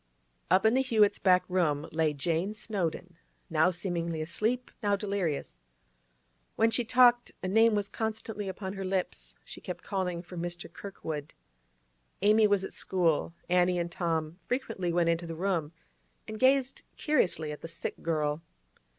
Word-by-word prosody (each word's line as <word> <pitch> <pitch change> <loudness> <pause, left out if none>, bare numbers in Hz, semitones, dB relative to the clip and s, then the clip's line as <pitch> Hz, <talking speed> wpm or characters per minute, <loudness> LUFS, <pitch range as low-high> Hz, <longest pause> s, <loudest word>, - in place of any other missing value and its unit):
Up 185 +3 +4
in 220 - +5
the 260 - +4
Hewetts' 215 -5 +3
back 185 -1 +4
room 160 -5 +1
lay 160 -1 +2
Jane 165 +7 -1
Snowdon, 180 -5 -3 0.3
now 160 +2 +4
seemingly 170 -2 -2
asleep, 220 +10 -1
now 205 -2 +2
delirious. 195 -7 -2 1.0
When 225 +1 +3
she 240 +2 +2
talked, 245 0 +4
a - - -1
name 225 +3 +4
was 205 -1 0
constantly 220 -1 -4
upon 190 0 -5
her 195 -1 -5
lips; 185 -1 -2
she - - -10
kept - - -6
calling 180 -3 -2
for 180 +1 -11
'Mr. 175 0 -4
Kirkwood.' 160 -7 -6 0.9
Amy 215 +1 +6
was 205 -2 +2
at - - -5
school; 170 -2 0
Annie 180 0 +3
and 170 0 -2
Tom 165 -1 -2
frequently 195 -8 -2
went 170 0 +2
into 170 0 0
the 165 - -5
room 170 -4 -1 0.6
and 215 0 -6
gazed 265 0 +3 0.2
curiously 180 - +1
at 150 - -8
the - - -6
sick 165 - -5
girl. 155 -2 -1
185 Hz, 155 wpm, -29 LUFS, 165-210 Hz, 1.0 s, Amy